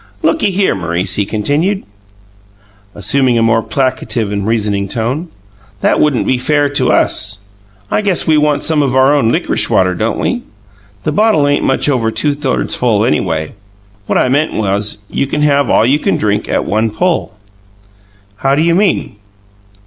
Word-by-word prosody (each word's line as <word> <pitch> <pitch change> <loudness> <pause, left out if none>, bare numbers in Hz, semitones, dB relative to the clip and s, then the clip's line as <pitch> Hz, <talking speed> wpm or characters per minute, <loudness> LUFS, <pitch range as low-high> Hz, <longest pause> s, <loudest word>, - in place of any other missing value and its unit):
"Looky 315 -10 +2
here, 195 +1 +1
M'rice," 90 0 -2
he 100 0 -1
continued, 150 - -1 1.1
assuming 130 +4 +1
a 115 - +2
more 115 0 +2
placative 130 -4 -1
and 100 0 -3
reasoning 105 -3 0
tone, 120 - -3 0.5
"that - - +2
wouldn't 145 -5 +1
be 130 - +1
fair 145 +2 +1
to 145 - +1
us. 100 -1 +1 0.5
I - - +1
guess 195 -4 0
we 160 - +3
want 150 -1 +1
some 160 -2 +2
of 135 -3 0
our 130 +2 +4
own 135 -6 +2
lickrish - - -1
water, 95 -1 +2
don't 110 +6 -2
we? 245 - -1 0.6
The 155 - -1
bottle 160 -5 +2
ain't 145 0 +1
much 135 - +1
over 125 -6 +1
two 115 +7 0
thirds 140 -3 -2
full 110 -3 +1
anyway. 80 +1 -1 0.5
What - - +1
I - - +2
meant 145 +5 +1
was, 105 0 -1
you 140 - -2
can 150 +2 -1
have 140 -1 +2
all - - +3
you 140 +5 +2
can - - 0
drink 105 0 -1
at - - 0
one 110 +2 0
pull." 170 - -1 1.0
"How 135 +5 +1
do 155 - +1
you 170 0 +2
mean?" 185 - 0
130 Hz, 170 wpm, -14 LUFS, 105-150 Hz, 1.1 s, our